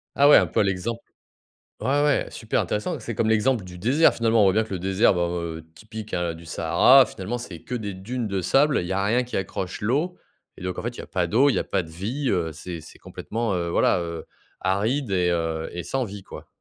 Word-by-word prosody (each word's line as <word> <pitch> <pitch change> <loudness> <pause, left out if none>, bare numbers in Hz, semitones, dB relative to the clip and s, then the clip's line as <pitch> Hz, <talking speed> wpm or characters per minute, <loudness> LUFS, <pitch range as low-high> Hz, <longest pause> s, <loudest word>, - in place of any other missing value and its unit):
Ah 140 +1 +5
ouais, 150 - +9
un - - +3
peu - - +1
à - - +4
l'exemple 100 +5 -2 0.8
ouais, 145 +2 +1
ouais, 145 -2 +2
super 110 - -1
intéressant. 105 0 -2
C'est 115 - -6
comme 110 +1 0
l'exemple 110 -1 +2
du 90 -1 -10
désert. 135 - +4
Finalement, 115 -1 +2
on - - +6
voit 95 - +4
bien 110 +2 +2
que 110 - -10
le - - -3
désert, 95 +1 +3
bah, 85 -1 0
heu, 85 -2 -4
typique, 110 +2 -9
hein, 85 -2 -1
du 85 - -12
Sahara. 85 - +5
Finalement, 105 +6 -5
c'est 95 -9 -8
que 125 - -6
des 105 -4 -4
dunes 115 +6 -4
de 95 -1 -1
sable. 135 - +3
Il 85 - -4
y - - -3
a 100 +1 0
rien 115 +5 +2
qui 125 - -6
accroche 95 0 -4
l'eau 145 - 0 0.4
et - - -12
donc, 90 0 -4
en - - -3
fait, 120 +1 -4
il - - -14
y - - -5
a - - -10
pas 90 -2 -1
d'eau. 120 +11 +4
Il - - 0
y - - +1
a - - -1
pas 95 - -1
de 80 - -12
vie, 115 - -3
heu. 85 -2 0
C'est 85 +1 -7
c'est - - -14
complètement, 115 -2 -4
heu, 85 -1 -1
voilà, 85 - +2
heu, 85 -1 -5 0.3
aride 105 +7 0
et, 90 -1 +2
heu, 80 -1 -1
et 90 - -4
sans 135 -1 -1
vie, 100 -2 -8
quoi. - - -11
100 Hz, 255 wpm, -24 LUFS, 90-120 Hz, 0.8 s, ouais